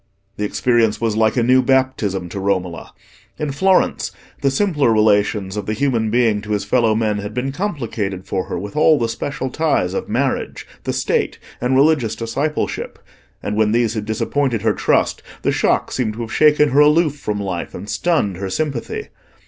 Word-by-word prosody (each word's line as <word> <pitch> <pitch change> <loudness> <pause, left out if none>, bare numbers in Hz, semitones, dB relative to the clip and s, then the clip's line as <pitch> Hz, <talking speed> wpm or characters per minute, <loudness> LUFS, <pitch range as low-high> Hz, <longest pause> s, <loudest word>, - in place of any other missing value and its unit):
The 105 - -1
experience 115 0 +1
was 115 -2 0
like 110 +2 +2
a 120 - +3
new 130 +2 +5
baptism 130 -9 0
to 100 - -5
Romola. 95 -3 -2 0.5
In 150 -2 -2
Florence 190 +7 +2 0.3
the 140 - +3
simpler 145 - +2
relations 105 -2 +2
of 105 -2 -4
the 110 - -1
human 120 -5 0
being 115 -2 +2
to 105 +1 -4
his 100 -1 -1
fellow 110 0 +2
men 110 -2 0
had 105 +2 -6
been 130 +2 -1
complicated 115 - -3
for 95 -2 -2
her - - -4
with 100 +3 -7
all 155 0 +5
the 115 - 0
special 130 +3 -4
ties 145 - 0
of - - -3
marriage, - - -1 0.2
the - - 0
State, - - 0 0.2
and 125 +2 +1
religious 135 -5 +3
discipleship, 135 +7 -3 0.5
and 105 - -2
when 110 0 +2
these 115 -2 +2
had 110 -2 -3
disappointed 115 +1 -1
her 110 -2 +3
trust, - - +1 0.2
the - - +2
shock - - +1
seemed 115 -4 -1
to 115 - -6
have 115 -1 -5
shaken 150 -1 +4
her 140 - +3
aloof 150 0 +4
from 105 -7 -3
life 95 -4 -4
and 100 - -7
stunned 105 - 0
her 95 0 -4
sympathy. 140 +2 -3
115 Hz, 185 wpm, -19 LUFS, 105-140 Hz, 0.5 s, new